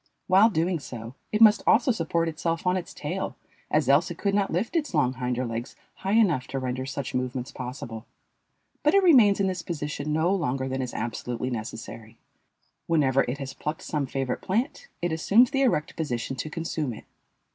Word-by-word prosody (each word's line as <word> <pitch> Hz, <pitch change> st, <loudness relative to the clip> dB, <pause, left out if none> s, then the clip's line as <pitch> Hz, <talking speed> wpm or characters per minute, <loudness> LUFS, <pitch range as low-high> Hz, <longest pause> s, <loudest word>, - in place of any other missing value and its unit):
While 195 Hz, +4 st, +6 dB
doing 175 Hz, -2 st, 0 dB
so 120 Hz, -4 st, -8 dB, 0.2 s
it 215 Hz, -, 0 dB
must 215 Hz, 0 st, +7 dB
also 240 Hz, +3 st, +5 dB
support 165 Hz, -5 st, 0 dB
itself 165 Hz, +2 st, -2 dB
on 180 Hz, 0 st, +3 dB
its 180 Hz, -2 st, -4 dB
tail, -, -, -4 dB, 0.3 s
as -, -, +2 dB
else -, -, +4 dB
it -, -, -6 dB
could 200 Hz, -1 st, 0 dB
not 200 Hz, -1 st, +1 dB
lift 195 Hz, -, -1 dB
its 300 Hz, -, 0 dB
long 130 Hz, -4 st, +3 dB
hinder 125 Hz, 0 st, -2 dB
legs 115 Hz, +2 st, -5 dB, 0.2 s
high 195 Hz, +1 st, -2 dB
enough 175 Hz, -, +3 dB
to 135 Hz, -, -4 dB
render 130 Hz, 0 st, -3 dB
such 140 Hz, -1 st, -4 dB
movements 125 Hz, 0 st, -2 dB
possible. 125 Hz, -3 st, -7 dB, 0.7 s
But 300 Hz, +6 st, +3 dB
it 395 Hz, -, +5 dB
remains 240 Hz, -, +6 dB
in 200 Hz, -, +2 dB
this 185 Hz, -2 st, -1 dB
position 150 Hz, -2 st, -4 dB
no 160 Hz, +5 st, +2 dB
longer 135 Hz, -8 st, -1 dB
than 130 Hz, 0 st, -2 dB
is 125 Hz, -2 st, -5 dB
absolutely 120 Hz, +2 st, -3 dB
necessary. 115 Hz, 0 st, -7 dB, 0.7 s
Whenever 135 Hz, -5 st, +3 dB
it 125 Hz, +3 st, -2 dB
has 135 Hz, -1 st, -6 dB
plucked 150 Hz, +1 st, -5 dB
some 145 Hz, -3 st, -2 dB
favorite 135 Hz, -1 st, -2 dB
plant, 245 Hz, -, -2 dB, 0.2 s
it 175 Hz, -, +1 dB
assumes 210 Hz, +10 st, +4 dB
the 270 Hz, -1 st, +1 dB
erect 175 Hz, -, +1 dB
position 135 Hz, -5 st, -3 dB
to 155 Hz, -, -4 dB
consume 155 Hz, -4 st, -3 dB
it. -, -, -12 dB
150 Hz, 190 wpm, -26 LUFS, 130-190 Hz, 0.7 s, must